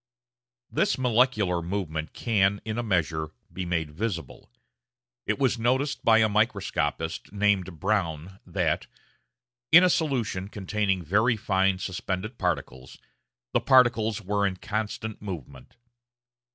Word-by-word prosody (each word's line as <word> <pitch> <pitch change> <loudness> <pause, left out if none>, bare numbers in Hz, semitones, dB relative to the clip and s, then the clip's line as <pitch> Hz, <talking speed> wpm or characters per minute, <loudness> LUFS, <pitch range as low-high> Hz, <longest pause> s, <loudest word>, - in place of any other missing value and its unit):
This - - +1
molecular 115 -8 +2
movement 80 -4 -4
can, 100 -3 +1
in 110 +1 -3
a - - +1
measure, 80 -7 0 0.2
be 95 - -4
made 85 -3 -1
visible. 85 - -5 0.8
It - - +1
was 130 -4 +1
noticed 130 +5 0
by 115 -1 +6
a 110 -1 +5
microscopist 100 -7 -1
named 100 -4 0
Brown 90 -2 -1
that, - - -1 0.8
in 175 - +9
a 180 - +5
solution 115 - -1
containing 100 -2 -1
very 110 - +2
fine 95 -3 +1
suspended 95 +4 -4
particles, 65 +1 -3 0.6
the - - +3
particles 115 -4 +3
were 100 +1 +1
in 95 - -3
constant 110 +1 -4
movement. 80 - -8
100 Hz, 120 wpm, -26 LUFS, 90-110 Hz, 0.8 s, in